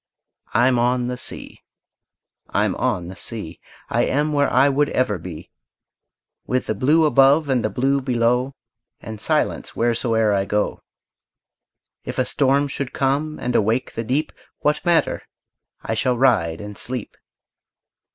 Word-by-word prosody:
I'm 120 +1 +4
on 125 +1 +1
the 125 - -2
sea, 125 - -6 0.9
I'm - - +1
on 85 -1 -1
the 95 - -8
sea, 95 -3 -6 0.3
I - - +1
am 150 +2 0
where 145 -1 +2
I 135 +2 +5
would 145 +1 +2
ever 105 -7 0
be, 80 -2 -9 1.0
With 130 0 0
the - - -1
blue 155 +5 +3
above 140 +1 +4
and 130 -3 +1
the 110 - 0
blue 135 +6 +1
below, 125 +1 0 0.4
And 110 -1 -8
silence - - -1
wheresoe'er 115 -2 +1
I 100 -1 +1
go. 105 +1 -1 1.2
If - - -6
a - - +2
storm 140 +1 +2
should 140 -1 -5
come 145 +3 0
and 125 0 -2
awake 115 +5 +1
the 115 - -3
deep, 135 +7 -1 0.3
What 150 0 +1
matter? 170 -2 +2 0.6
I - - -2
shall 125 +2 +1
ride 105 -11 +2
and 105 0 -8
sleep. 125 -3 -5
125 Hz, 145 wpm, -21 LUFS, 110-140 Hz, 1.2 s, I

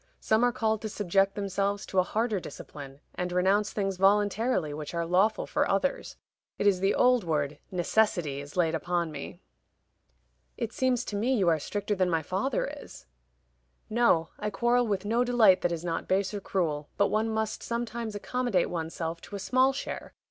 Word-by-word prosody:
Some 220 +2 +2
are 245 - +4
called 220 -2 0
to 220 - -4
subject 195 -1 +1
themselves 200 0 -1
to 190 - 0
a - - +7
harder 215 +2 -1
discipline, 140 -3 -10
and 180 0 -3
renounce 195 +4 +2
things 195 -2 -2
voluntarily 205 -2 +2
which 150 +2 -6
are 170 0 0
lawful 190 +6 +2
for - - 0
others. - - -1 0.4
It - - -1
is 195 -3 +4
the 195 +2 +2
old 250 -2 +4
word 150 -3 -1
'necessity' 175 -6 +1
is 145 +4 -11
laid 165 -2 +2
upon 170 +1 -1
me. 145 -2 -8 1.2
"It - - -3
seems 255 -2 +1
to 205 - -5
me 240 +6 +1
you 190 -7 +3
are 160 -2 +2
stricter 205 +6 -2
than 185 -2 +1
my 165 -2 0
father 200 - -1
is." - - -12 0.9
"No; 215 -9 +3
I 210 - -2
quarrel 240 +4 +2
with 200 -2 -1
no 230 +4 +2
delight 235 -6 +5
that 175 - +1
is 170 0 -4
not 165 -1 -2
base 190 +1 +1
or 205 - -4
cruel, 155 -7 -2
but 200 - +3
one 220 +1 +1
must 220 -1 -2
sometimes 235 -2 -4
accommodate 240 -3 0
one's 165 -2 -4
self 165 0 -4
to 205 - -9
a - - -4
small 255 +6 +3
share. 275 - -6
195 Hz, 185 wpm, -28 LUFS, 175-220 Hz, 1.2 s, a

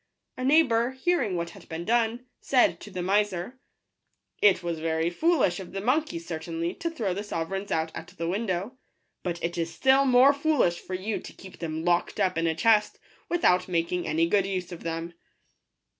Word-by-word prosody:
A 255 - -5
neighbour, 260 -4 +3
hearing 265 - 0
what 170 0 -3
had - - -15
been 165 +1 -5
done, 235 +2 +1
said 255 -3 +3
to - - -10
the 185 -2 -4
miser, 205 +4 0 0.8
$t - - +8
It 190 -2 +3
was 170 -2 -3
very 160 +1 0
foolish 265 - +2
of 185 -1 -9
the 195 - -3
monkey, 255 - 0
certainly, 165 0 -4
to 335 - -3
throw 225 - -2
the 200 - -3
sove 165 -5 -4
reigns 195 +1 -4
out 160 0 -1
at - - -7
the 165 - -2
window; 200 +5 -2 0.4
but 175 -2 -4
it 170 +1 -2
is 165 0 -2
still 265 +6 +4
more 260 +2 +6
foolish 285 - +1
for 185 - -6
you 205 +4 -3
to - - -11
keep 190 -1 -13
them 160 0 -4
locked 175 -1 +1
up 185 -1 +2
in 165 0 0
a 160 - 0
chest, 210 +4 +3 0.3
without 185 - +3
making 175 0 -1
any 165 +2 +2
good 195 +1 +2
use 185 -2 -3
of 175 - -8
them." 165 +1 -4
185 Hz, 195 wpm, -27 LUFS, 170-240 Hz, 0.8 s, $t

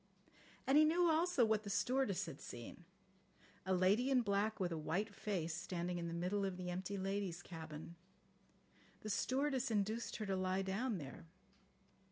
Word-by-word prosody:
And 270 +3 +6
he - - +8
knew 335 +2 +4
also 320 -5 +4
what 220 -1 +2
the 205 - -7
stewardess 205 +1 +1
had 155 -4 -8
seen: 120 +8 -8 0.8
A 190 - +3
lady 200 +8 +4
in 255 -3 +4
black 205 +1 +1
with 180 -2 0
a - - -1
white 200 +7 -1
face 180 -6 -2
standing 175 0 -2
in 170 - -3
the 165 - -4
middle 185 +4 0
of 190 -2 -2
the 180 -1 -3
empty 185 +3 -3
ladies' 190 -2 -2
cabin. 160 -1 -8 1.1
The 215 - -3
stewardess 265 +3 +1
induced 220 +2 0
her 215 - -3
to 195 -1 0
lie 185 +1 0
down 205 +4 -1
there. 145 +1 -8
195 Hz, 170 wpm, -39 LUFS, 180-230 Hz, 1.1 s, he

